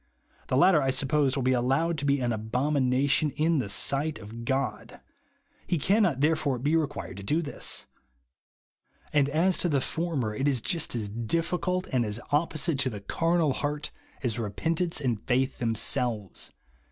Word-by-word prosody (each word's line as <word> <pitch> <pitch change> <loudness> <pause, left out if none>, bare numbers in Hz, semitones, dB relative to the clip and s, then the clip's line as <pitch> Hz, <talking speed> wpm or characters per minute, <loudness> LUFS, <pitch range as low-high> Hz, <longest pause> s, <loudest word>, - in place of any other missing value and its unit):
The 130 - +1
latter, 155 +2 +5
I 135 - +1
suppose, 135 +1 +1
will 135 - -1
be 130 - +2
allowed 135 +7 +1
to 145 - -4
be 140 0 +2
an 120 -1 0
abomination 130 +5 +1
in 160 0 +2
the 105 - -3
sight 140 +8 +2
of 110 +2 -9
God; 130 -2 -2 0.7
Ire 175 - +3
can 200 +9 +3
not, 160 - +1
therefore, 150 -3 +2
be 145 +6 +1
required 145 - -2
to 100 - -7
do 155 +11 0
this; 145 - -3 1.3
and 145 -2 +3
as 170 +5 +2
to 175 - +2
the 145 -3 +2
former, 145 -7 -2
it 135 +6 -1
is 135 -3 +2
just 160 +4 0
as 110 -3 -2
difficult 170 - -1
and 125 -2 +2
as 105 0 -3
opposite 155 0 +1
to 130 - +1
the 105 -4 -7
carnal 165 +5 +1
heart 150 +1 -3 0.3
as 120 -2 -1
repent 120 - -2
ance 170 -3 +1
and 120 -7 -1
faith 130 +2 +1
themselves. 115 -2 0
140 Hz, 170 wpm, -27 LUFS, 120-160 Hz, 1.3 s, latter